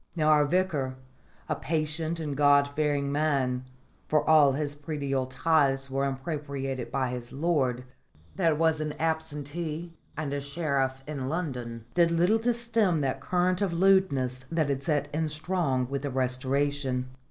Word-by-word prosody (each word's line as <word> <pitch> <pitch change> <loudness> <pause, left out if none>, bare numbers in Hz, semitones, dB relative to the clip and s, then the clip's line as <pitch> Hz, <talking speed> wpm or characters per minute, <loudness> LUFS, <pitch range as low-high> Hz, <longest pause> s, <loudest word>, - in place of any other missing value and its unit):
Now, 155 -2 +2
our 150 -1 +5
Vicar 155 -6 0 0.5
a - - 0
patient 160 +2 -1
and 150 -3 -3
God 145 0 +5
fearing 145 -2 0
man, 135 -4 0 0.4
for 155 -1 +1
all 150 -3 +6
his 145 +1 -2
predial 140 -3 -2
tithes 135 -1 +2
were 135 +1 0
impropriated 135 -2 -4
by 130 -2 0
his 120 -1 -6
lord, 135 -5 0 0.5
that 165 -5 +2
was 160 -1 +2
an 150 -1 -2
absentee 160 +1 -3 0.2
and 150 -2 -2
a 145 - -2
sheriff 140 -3 -1
in 140 -3 -4
London 125 -9 -4
did 170 -1 +4
little 175 +6 +3
to 240 +2 +2
stem 225 -8 +1
that 135 -2 -1
current 180 +1 +1
of 195 -4 0
lewdness 165 -9 +2
that 160 -3 +1
had 135 -1 -1
set 145 -2 0
in 155 +1 0
strong 150 -5 -1
with 140 +1 -3
the 145 - -3
Restoration. 130 0 0
145 Hz, 155 wpm, -28 LUFS, 135-165 Hz, 0.5 s, all